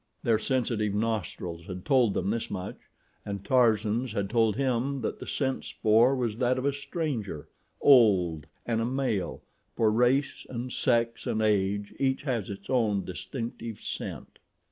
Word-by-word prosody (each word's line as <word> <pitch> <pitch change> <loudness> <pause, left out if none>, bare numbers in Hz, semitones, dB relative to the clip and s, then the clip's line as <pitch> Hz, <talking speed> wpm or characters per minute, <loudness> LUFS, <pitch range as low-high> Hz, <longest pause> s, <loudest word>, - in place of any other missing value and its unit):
Their 115 -2 +3
sensitive 115 -5 0
nostrils 95 -6 -3
had 90 -1 -7
told 125 -7 +3
them 100 - 0
this 115 0 -2
much 95 -2 -7 0.3
and 100 -1 -5
Tarzan's 115 -1 +2
had 100 -2 -2
told 115 -3 +3
him 135 +1 0
that 110 - -3
the - - -8
scent 135 -2 -1
spoor 115 +5 +3
was 120 -3 -2
that 125 0 +2
of 130 - -2
a 140 - +2
stranger—old 110 - +1 0.2
and 115 -1 0
a - - 0
male, 125 -6 -2 0.3
for 110 -2 +3
race 125 +5 +2
and 125 0 -5
sex 115 0 +1
and 110 - 0
age 105 -1 +1
each 130 0 +1
has 120 -8 -2
its 100 0 -8
own 105 -7 +1
distinctive 115 +3 -6
scent. - - -6
115 Hz, 150 wpm, -28 LUFS, 105-130 Hz, 0.3 s, Their